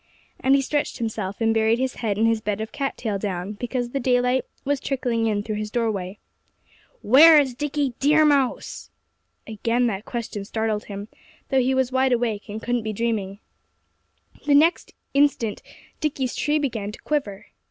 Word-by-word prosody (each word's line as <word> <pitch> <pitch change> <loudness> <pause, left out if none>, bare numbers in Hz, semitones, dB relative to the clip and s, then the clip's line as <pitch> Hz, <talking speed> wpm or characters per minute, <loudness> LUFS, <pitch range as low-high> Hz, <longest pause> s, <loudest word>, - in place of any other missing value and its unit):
And 270 +1 +4
he 275 - +2
stretched 290 +2 -1
himself, 215 -4 -4
and 225 0 +3
buried 225 +1 +2
his 260 0 -2
head 215 -4 -1
in 220 - +3
his 225 -1 +2
bed 210 -1 -2
of 220 0 -5
cat 275 -1 -3
tail 210 -4 -2
down, 190 -1 -3
because 245 +2 -3
the 275 - -1
daylight 250 0 +2 0.2
was 285 0 0
trickling 245 -5 -1
in 205 -2 0
through 215 -1 -3
his 210 0 -4
doorway. 210 -4 -2 0.9
"Where's 290 +2 +7
Dickie 285 0 -2
Deer 305 +2 +4
Mouse?" 280 -4 0 0.6
Again 230 +2 0
that 210 -3 -2
question 230 -4 -5
startled 220 0 -2
him, 200 0 -7 0.4
though 265 -1 +3
he 260 +1 +1
was 260 -1 +1
wide 260 0 +2
awake, 230 -4 -1
and 210 +1 -5
couldn't 240 0 0
be 215 0 -4
dreaming. 210 -3 -2 1.1
The 285 - +5
next 320 +4 +3 0.2
instant 275 -7 +1 0.4
Dickie's 275 -5 -1
tree 300 +1 +1
began 225 -8 -2
to - - -11
quiver. 240 -11 -2
235 Hz, 170 wpm, -23 LUFS, 215-265 Hz, 1.1 s, Where's